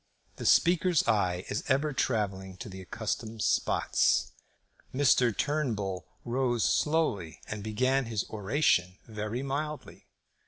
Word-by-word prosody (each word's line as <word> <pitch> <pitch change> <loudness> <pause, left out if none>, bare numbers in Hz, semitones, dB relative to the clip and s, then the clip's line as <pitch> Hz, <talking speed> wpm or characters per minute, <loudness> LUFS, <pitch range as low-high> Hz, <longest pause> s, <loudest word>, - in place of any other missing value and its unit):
The - - -3
Speaker's 175 -1 +4
eye 95 -5 +1
is 105 - -3
ever 145 +2 +1
travelling 95 -7 -1
to 105 - -8
the 95 0 -8
accustomed 110 +3 -4
spots. - - +2 0.6
Mr. 130 -3 +4
Turnbull 105 - -1 0.2
rose 120 -1 0
slowly 130 - 0
and 105 -1 -5
began 130 +5 +1
his 110 -2 -2
oration 100 -4 +1
very 110 +3 -4
mildly. 150 +2 -5
115 Hz, 115 wpm, -29 LUFS, 100-135 Hz, 0.6 s, Speaker's